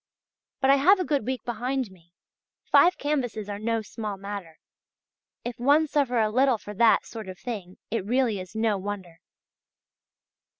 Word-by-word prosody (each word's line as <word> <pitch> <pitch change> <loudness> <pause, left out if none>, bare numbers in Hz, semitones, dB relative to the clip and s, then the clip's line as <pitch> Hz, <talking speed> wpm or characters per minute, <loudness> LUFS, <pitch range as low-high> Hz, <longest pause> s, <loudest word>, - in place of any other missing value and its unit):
But 265 0 +5
I 275 - +6
have 375 +8 +5
a 365 - 0
good 280 -7 0
week 260 -3 -2
behind 245 0 -2
me: 175 -1 -21 0.5
five 360 - +5
canvases 250 -8 -2
are 205 -1 -5
no 225 +1 -1
small 210 -1 -5
matter; 195 -5 -7 0.9
if 240 -1 -5
one 290 +5 +4
suffer 280 -5 0
a 215 -1 +2
little 255 +1 +3
for 210 0 -9
that 225 +2 +4
sort 220 -4 -8
of 185 - -8
thing 195 -6 -6
it 225 -3 -1
really 235 -1 +1
is 185 +3 -9
no 220 -2 +1
wonder. 190 -4 -6
225 Hz, 165 wpm, -26 LUFS, 200-260 Hz, 0.9 s, I